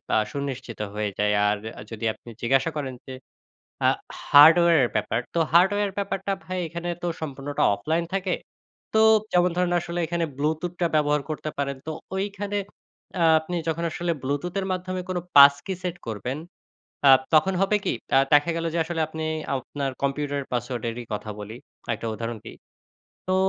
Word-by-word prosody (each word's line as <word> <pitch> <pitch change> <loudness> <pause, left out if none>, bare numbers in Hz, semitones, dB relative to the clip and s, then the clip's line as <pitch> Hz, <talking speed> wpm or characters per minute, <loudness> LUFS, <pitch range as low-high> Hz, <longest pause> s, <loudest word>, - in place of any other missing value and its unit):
আ - - +5
সুনিশ্চিত 135 -4 -5
হয়ে 105 -1 -2
যায়। 105 0 +2
আর 105 0 +1 0.2
আ - - -7
যদি 115 0 -5
আপনি 120 - -15
জিজ্ঞাসা 135 +5 +2
করেন 135 -3 -3
যে 130 - -8 0.7
আ - - +7 0.4
হার্ডওয়্যারের 160 -2 +7
ব্যাপার, 105 +1 0
তো 170 - +1
হার্ডওয়্যার 200 +3 +4
ব্যাপারটা 195 0 -2
ভাই 185 0 -3
এখানে 170 +1 -5
তো - - 0
সম্পূর্ণটা 145 -1 -3
অফলাইন 160 +12 -1
থাকে, 190 -1 0 0.6
তো 220 - +5 0.3
যেমন 180 0 +4
ধরুন 180 -1 +1
আসলে 175 0 -4
এখানে 170 0 -1
Bluetooth 160 +4 -1
টা 170 - +4
ব্যবহার 150 -1 +2
করতে 155 0 -3
পারেন। 140 -1 -2
তো - - -1 0.2
ঐখানে 205 +1 -3 0.6
আ - - +4 0.2
আপনি 160 +3 -5
যখন 165 +1 -1
আসলে 175 +1 -2
Bluetooth 145 +7 -2
এর 190 - -2
মাধ্যমে 185 0 -3
কোনো 180 -1 -1
pass-key 140 +6 +7
set 180 -2 -2
করবেন, 115 +5 -3 0.7
আ - - +9 0.2
তখন 175 +5 +5
হবে 195 +2 +3
কি? - - +1 0.2
আ - - +7
দেখা 145 +3 +5
গেল 165 0 -2
যে - - -1
আসলে 165 0 -2
আপনি 160 0 -6 0.3
আপনার 135 +1 -3
কম্পিউটারের 140 0 -1
পাসওয়ার্ডেরই 120 -1 -3
কথা 105 +1 -5
বলি, 105 +3 -7 0.4
একটা 115 +1 -5
উদাহরণ 115 +1 -4
দিই। - - -10 0.7
তো 185 - +3
150 Hz, 165 wpm, -25 LUFS, 130-175 Hz, 0.7 s, আ